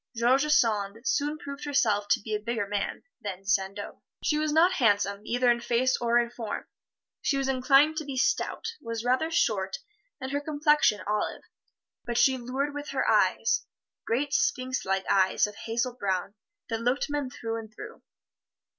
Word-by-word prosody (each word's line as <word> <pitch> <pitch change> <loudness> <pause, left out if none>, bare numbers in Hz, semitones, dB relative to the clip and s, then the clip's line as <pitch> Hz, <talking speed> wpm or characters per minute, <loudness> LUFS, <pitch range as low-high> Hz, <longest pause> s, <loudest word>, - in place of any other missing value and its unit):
George 255 +5 +3
Sand 210 -5 +2
soon 295 +2 0
proved 280 -1 -8
herself 220 -8 +1
to - - +3
be 215 +1 -6
a 210 - 0
bigger 230 0 -2
man 205 0 -3 0.2
than 195 -2 -6
Sandeau. 195 +1 -1 0.2
She 300 -1 +1
was 310 0 0
not 330 +4 +5
handsome, 205 - +2
either 245 +1 +3
in 235 - +1
face 245 +2 +2
or 235 0 +2
in 235 0 +1
form. 230 -3 -5 0.6
She 275 - +1
was 270 -1 0
inclined 275 +4 +4
to 310 - -1
be 275 -2 -5
stout 245 - 0
was 230 0 -5
rather 255 +6 +2
short 195 - 0 0.4
and 260 0 -5
her 285 +1 -1
complexion 295 - +2
olive. 210 +1 -2 0.6
But 240 -1 -3
she 265 +1 +5
lured 265 +4 -2
with 290 +1 -6
her - - -1
eyes - - +2 0.4
great 275 +5 -1
sphinx 255 0 0
like 190 0 0
eyes 190 -1 +3
of 210 - -7
hazel 235 +4 -2
brown 195 -4 -2 0.4
that 225 -1 -2
looked 245 +4 0
men 290 -3 -2
through 225 -2 -4
and 220 -1 -10
through. 425 - -10
240 Hz, 175 wpm, -27 LUFS, 210-280 Hz, 0.6 s, not